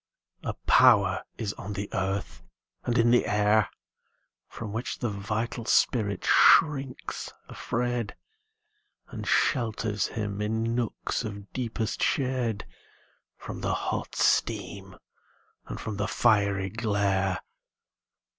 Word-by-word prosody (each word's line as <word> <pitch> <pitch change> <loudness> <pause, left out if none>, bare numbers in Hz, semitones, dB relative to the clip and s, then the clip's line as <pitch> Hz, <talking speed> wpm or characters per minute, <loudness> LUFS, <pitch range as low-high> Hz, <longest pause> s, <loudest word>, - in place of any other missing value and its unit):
A - - -4
power - - +5
is 105 -2 -3
on 105 - -5
the 100 0 -4
earth 95 0 -2 0.4
and 120 0 +1
in 120 0 +4
the 120 - +4
air 105 +1 +3 0.8
From 105 -3 -7
which 115 +3 -3
the 120 - -2
vital 105 +4 -3
spirit 105 -5 +2
shrinks 140 -5 +3 0.2
afraid, 120 -2 -2 0.9
And - - -7
shelters 110 -4 +1
him, 105 -2 -4
in 110 +2 -1
nooks 120 0 -2
of 100 -2 -8
deepest 115 -3 -3
shade, 125 - 0 0.7
From - - -7
the - - 0
hot - - -3
steam - - 0 0.7
and - - -6
from 105 -2 -5
the 100 0 -1
fiery 100 -5 +2
glare. 100 -4 0
110 Hz, 110 wpm, -27 LUFS, 100-120 Hz, 0.9 s, power